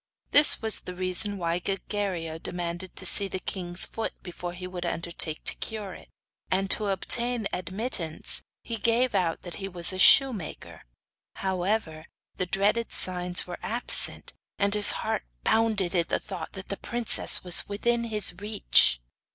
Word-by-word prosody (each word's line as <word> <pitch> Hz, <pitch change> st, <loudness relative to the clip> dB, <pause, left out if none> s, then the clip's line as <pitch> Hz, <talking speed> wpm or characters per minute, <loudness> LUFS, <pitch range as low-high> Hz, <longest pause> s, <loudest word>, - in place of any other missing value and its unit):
This 290 Hz, -5 st, +8 dB
was 220 Hz, -2 st, +3 dB
the 180 Hz, -, -10 dB
reason 185 Hz, +3 st, +2 dB
why 170 Hz, -1 st, -2 dB
Gilguerillo 185 Hz, -4 st, -5 dB
demanded 175 Hz, +1 st, -6 dB
to 185 Hz, -, -7 dB
see 200 Hz, +2 st, +8 dB
the 190 Hz, -, -6 dB
king's 180 Hz, -1 st, +2 dB
foot 225 Hz, -, -6 dB
before 175 Hz, -1 st, -8 dB
he 180 Hz, +1 st, -9 dB
would 180 Hz, -1 st, -7 dB
undertake 170 Hz, -2 st, -2 dB
to -, -, +1 dB
cure 210 Hz, -4 st, -6 dB
it; -, -, -14 dB, 0.4 s
and 190 Hz, +1 st, -1 dB
to 210 Hz, -, -1 dB
obtain 235 Hz, +3 st, +2 dB
admittance 185 Hz, -3 st, -2 dB, 0.2 s
he 230 Hz, -, -6 dB
gave 235 Hz, +3 st, 0 dB
out 165 Hz, -3 st, -2 dB
that 175 Hz, -, -8 dB
he 195 Hz, -, -6 dB
was 180 Hz, 0 st, +3 dB
a 185 Hz, -, -7 dB
shoemaker. 230 Hz, -, +3 dB, 0.5 s
However, 185 Hz, -4 st, -3 dB, 0.3 s
the 185 Hz, -, -3 dB
dreaded 210 Hz, +5 st, -1 dB
signs 180 Hz, -1 st, -2 dB
were 180 Hz, -, -9 dB
absent, 235 Hz, +3 st, +2 dB, 0.2 s
and 200 Hz, 0 st, -1 dB
his 210 Hz, -1 st, +5 dB, 0.2 s
heart -, -, -3 dB, 0.2 s
bounded 215 Hz, -5 st, 0 dB
at 170 Hz, -2 st, -1 dB
the -, -, 0 dB
thought 180 Hz, -6 st, -9 dB
that 190 Hz, 0 st, -10 dB
the 200 Hz, -, -4 dB
princess 240 Hz, -1 st, +1 dB
was 180 Hz, +1 st, +1 dB
within 235 Hz, +3 st, -2 dB
his 215 Hz, -5 st, 0 dB
reach. 205 Hz, -, +2 dB
190 Hz, 160 wpm, -25 LUFS, 175-215 Hz, 0.5 s, This